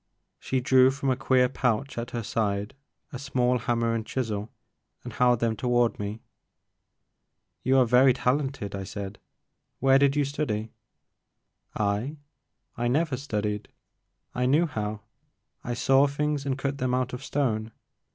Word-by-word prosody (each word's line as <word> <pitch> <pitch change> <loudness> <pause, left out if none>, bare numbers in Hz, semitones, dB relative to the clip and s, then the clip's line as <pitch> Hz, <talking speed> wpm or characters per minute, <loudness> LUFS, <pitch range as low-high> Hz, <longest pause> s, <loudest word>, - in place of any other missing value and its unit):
She 130 - -1
drew 130 +1 +5
from 135 0 -1
a - - +2
queer 130 0 +3
pouch 125 +1 -1
at 120 0 -4
her 120 -1 -4
side 105 -2 -1 0.4
a 130 - -5
small 125 -2 +1
hammer 115 0 0
and 115 -1 -1
chisel 110 -3 -3 0.5
and - - -7
held 125 -2 +3
them 115 -1 +1
toward 120 0 +1
me. 105 +2 -4 1.4
You 130 +1 +3
are 130 - +5
very 125 +3 +5
talented," 130 -4 -1
I 100 -1 -4
said, 100 0 -7 0.6
where 135 +1 +4
did 140 0 +3
you 145 -1 +2
study?" 115 -7 -3 1.0
*'I? 105 +8 -1 0.6
I 120 - -1
never 150 +3 +1
studied, 105 -6 -3 0.3
— - - -51
I 125 - +3
knew 150 +6 +4
how. 105 -7 -4 0.6
I 120 - -3
saw 135 +3 +4
things 145 0 -2
and 135 -1 0
cut 140 +1 -3
them 125 0 0
out 130 0 -1
of 125 +1 -6
stone. 115 -7 -1
125 Hz, 150 wpm, -27 LUFS, 110-135 Hz, 1.4 s, drew